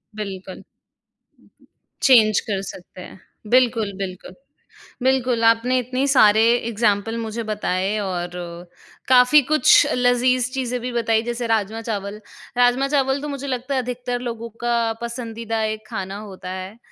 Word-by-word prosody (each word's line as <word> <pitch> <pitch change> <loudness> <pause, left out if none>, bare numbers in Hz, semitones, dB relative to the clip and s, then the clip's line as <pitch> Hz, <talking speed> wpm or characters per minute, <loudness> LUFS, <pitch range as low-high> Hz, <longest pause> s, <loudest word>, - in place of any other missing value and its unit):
बिल्कुल। 195 -3 -7 1.4
चेंज 220 -6 +6
कर 195 -3 -3
सकते 180 -1 -10
हैं। 185 - -12 0.3
बिल्कुल, 235 -5 +3
बिल्कुल। 185 -1 -6 0.7
बिल्कुल, 255 -3 +1
आपने 230 +3 +3
इतने 255 +2 -2
सारे 220 -5 +5 0.3
एग्ज़ाम्पल 225 0 0
मुझे 225 0 -4
बताए 205 -1 -1
और 180 -3 -4
अ, 175 0 -9 0.3
काफ़ी 255 +3 +6
कुछ 305 -4 +6
लज़ीज़ 250 0 +2
चीज़ें 250 -2 -2
भी 250 0 -4
बताई 225 -1 +1
जैसे 240 0 -3
राजमा-चावल। 215 -1 -2 0.4
राजमा-चावल 270 +2 +2
तो 295 - -5
मुझे 280 0 -5
लगता 260 +1 -3
है 260 - +1
अधिकतर 245 0 -4
लोगों 230 0 -6 0.2
का 240 0 +2 0.3
पसंदीदा 230 -2 -4
एक 215 0 -3
खाना 190 +1 -5
होता 185 -1 -9
है। 190 +4 -7
230 Hz, 130 wpm, -21 LUFS, 205-250 Hz, 1.4 s, चेंज